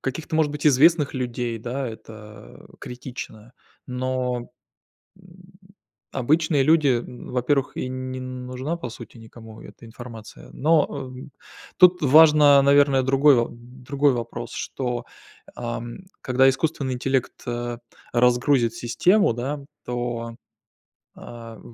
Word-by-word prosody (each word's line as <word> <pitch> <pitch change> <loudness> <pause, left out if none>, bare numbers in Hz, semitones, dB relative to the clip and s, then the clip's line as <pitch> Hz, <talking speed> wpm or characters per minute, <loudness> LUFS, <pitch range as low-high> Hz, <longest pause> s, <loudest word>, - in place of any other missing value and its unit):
каких-то, 155 +4 -4
может 150 -2 +1
быть, 150 +1 -2
известных 150 +1 +4
людей, 120 -2 -3
да, 125 +3 -4
это 105 - -12
критично. 125 -2 -9 0.3
Но, 125 -1 -3 0.7
м, 185 -2 -18 0.8
обычные 150 +2 +1
люди, 155 0 +4
м, 120 -1 -2
во-первых, 130 +2 0
и - - -2
н 130 0 -5
не 130 - -5
нужна, 130 +5 -5
по 125 -7 -6
сути, 120 +1 -12
никому 110 -1 -13
эта - - -14
информация. 115 -1 -11
Но, 155 +1 +2
э, - - -8 0.3
м, 140 - -11 0.5
тут 180 0 +6
важно, 150 -1 +7
наверное, 140 -1 +4
другой 135 +1 +4
во 120 -1 +1
другой 130 +4 -1
вопрос, 120 0 -5
что, 125 -2 -4 0.5
ам, 120 +2 -6 0.2
когда 130 +1 +3
искусственный 135 -1 -2
интеллект, 130 0 -1
э, 120 0 -3 0.4
разгрузит 125 0 +2
систему, 150 - +2
да, 135 +5 -4 0.3
то, 120 -1 -4 0.8
а, 115 -2 -11
130 Hz, 120 wpm, -23 LUFS, 120-140 Hz, 0.8 s, важно